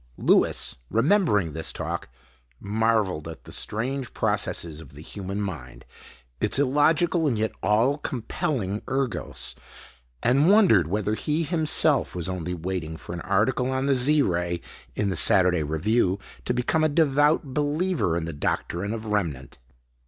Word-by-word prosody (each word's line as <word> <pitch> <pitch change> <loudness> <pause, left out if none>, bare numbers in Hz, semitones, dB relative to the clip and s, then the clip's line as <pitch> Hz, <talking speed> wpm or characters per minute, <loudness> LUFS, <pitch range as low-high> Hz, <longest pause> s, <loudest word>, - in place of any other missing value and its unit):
Lewis, - - +2
remembering 115 - +2
this 80 +1 -1
talk, - - -5 0.5
marveled 105 -6 0
at 80 - -9
the - - -12
strange 130 +4 -2
processes 80 -3 -1
of 75 -4 -13
the 75 - -11
human 95 +4 -6
mind, 65 -12 -6 0.5
its 105 - +2
illogical 155 +4 +2
and 120 -6 0
yet 110 +1 0
all 120 +8 +2
compelling 115 -5 -3
ergos, 135 -3 -3 0.7
and 140 +7 +4
wondered 185 - +5
whether 105 +3 -1
he 150 +8 -1
himself 155 - +3
was 85 -2 -2
only 90 -1 -3
waiting 85 -2 -4
for - - -9
an 85 - -5
article 115 +8 +1
on 130 0 -1
the 140 - +3
Z 140 +3 +4
Ray 85 -2 -1 0.3
in 105 - 0
the 95 - -1
Saturday 90 0 +4
Review 90 +6 +1 0.3
to - - 0
become 125 +6 +1
a 155 - +3
devout 145 -1 +2
believer 150 - 0
in 85 - -3
the 85 - -5
doctrine 90 +7 -2
of 110 0 -7
Remnant. 85 -14 -3
110 Hz, 145 wpm, -25 LUFS, 90-140 Hz, 0.7 s, wondered